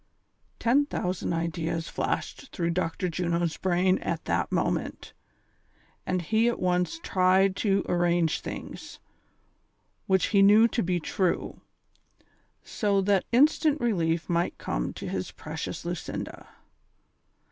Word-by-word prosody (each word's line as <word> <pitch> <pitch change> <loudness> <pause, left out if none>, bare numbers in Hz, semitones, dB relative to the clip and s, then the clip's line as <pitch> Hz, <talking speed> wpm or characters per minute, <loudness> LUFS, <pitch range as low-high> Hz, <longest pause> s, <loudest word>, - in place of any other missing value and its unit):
Ten 275 +5 +2
thousand 180 - -2
ideas 165 0 -2
Hashed - - -3
through 170 -1 -1
Dr. 180 +1 -1
Juno's 170 -1 -1
brain 185 0 +2
at 165 -1 -3
that 85 +1 0
moment, - - -2 0.9
and 185 -1 0
he 220 +6 +2
at 240 - 0
once 180 - 0
tried 185 +1 +3
to 195 -2 +1
arrange 175 -2 +1
things, - - -8 1.1
which 190 -1 +2
he 200 - +6
knew 210 +3 +7
to 235 - -1
be 180 0 0
true, 180 +2 -2 1.0
so 200 -2 0
that 195 -1 +2
instant 300 +4 +4
relief 170 - 0
might 170 0 0
come - - -3
to - - -7
his - - -3
precious - - -6
Lucinda. - - -5
185 Hz, 120 wpm, -27 LUFS, 170-200 Hz, 1.1 s, knew